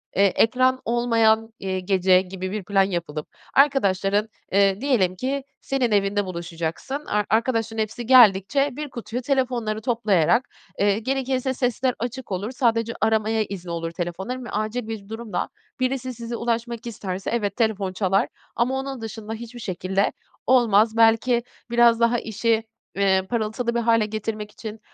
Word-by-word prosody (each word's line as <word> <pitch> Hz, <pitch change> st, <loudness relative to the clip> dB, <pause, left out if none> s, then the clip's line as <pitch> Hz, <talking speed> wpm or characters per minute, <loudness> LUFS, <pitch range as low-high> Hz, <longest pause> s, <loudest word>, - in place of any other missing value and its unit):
Eee, 195 Hz, -, +4 dB
ekran 255 Hz, +6 st, +3 dB
olmayan, 225 Hz, -1 st, +2 dB
eee, 190 Hz, -1 st, -2 dB
gece 185 Hz, -1 st, +3 dB
gibi 185 Hz, 0 st, -6 dB
bir 210 Hz, -1 st, -3 dB
plan 195 Hz, +1 st, +3 dB
yapılıp 170 Hz, -5 st, -3 dB, 0.3 s
arkadaşların, 205 Hz, -7 st, +3 dB, 0.2 s
eee, 195 Hz, +1 st, +3 dB
diyelim 225 Hz, -10 st, +2 dB
ki 270 Hz, +7 st, -2 dB, 0.2 s
senin 260 Hz, -4 st, 0 dB
evinde 205 Hz, 0 st, +2 dB
buluşacaksın, 170 Hz, -, -4 dB
ar 210 Hz, 0 st, 0 dB
arkadaşların 225 Hz, 0 st, +1 dB
hepsi 225 Hz, +3 st, -7 dB
geldikçe 240 Hz, +2 st, +5 dB
bir 295 Hz, +2 st, -5 dB
kutuya 240 Hz, 0 st, -5 dB
telefonları 245 Hz, -5 st, -1 dB
toplayarak, 225 Hz, -2 st, +2 dB, 0.3 s
eee, 205 Hz, +1 st, +3 dB
gerekirse 265 Hz, +1 st, -1 dB
sesler 250 Hz, 0 st, 0 dB
açık 245 Hz, 0 st, -5 dB
olur, 195 Hz, +5 st, -2 dB
sadece 230 Hz, -3 st, +1 dB
aramaya 220 Hz, 0 st, +2 dB
izni 185 Hz, -4 st, -7 dB
olur 165 Hz, 0 st, -3 dB
telefonların 190 Hz, +9 st, -4 dB
ve -, -, -8 dB
acil 215 Hz, +2 st, -2 dB
bir 210 Hz, -3 st, -7 dB
durumda 225 Hz, -1 st, -4 dB, 0.3 s
birisi 255 Hz, 0 st, -1 dB
size 235 Hz, 0 st, -6 dB
ulaşmak 235 Hz, 0 st, -2 dB
isterse, 195 Hz, -4 st, -4 dB
evet, 205 Hz, -4 st, -1 dB
telefon 205 Hz, -5 st, 0 dB
çalar 195 Hz, 0 st, +1 dB, 0.3 s
ama 260 Hz, +3 st, +1 dB
onun 270 Hz, -2 st, -5 dB
dışında 220 Hz, 0 st, -6 dB
hiçbir 235 Hz, +2 st, -8 dB
şekilde 190 Hz, -1 st, -1 dB, 0.3 s
olmaz. 225 Hz, -3 st, +4 dB
Belki 230 Hz, +2 st, +4 dB, 0.3 s
biraz 235 Hz, -1 st, +5 dB
daha 235 Hz, +1 st, +3 dB
işi, 225 Hz, +1 st, 0 dB, 0.3 s
eee, 195 Hz, -1 st, +3 dB
parıltılı 235 Hz, +1 st, -1 dB
bir -, -, +2 dB
hâle 230 Hz, -2 st, +3 dB
getirmek 215 Hz, 0 st, -4 dB
için 220 Hz, +1 st, -8 dB
225 Hz, 145 wpm, -23 LUFS, 195-240 Hz, 0.3 s, geldikçe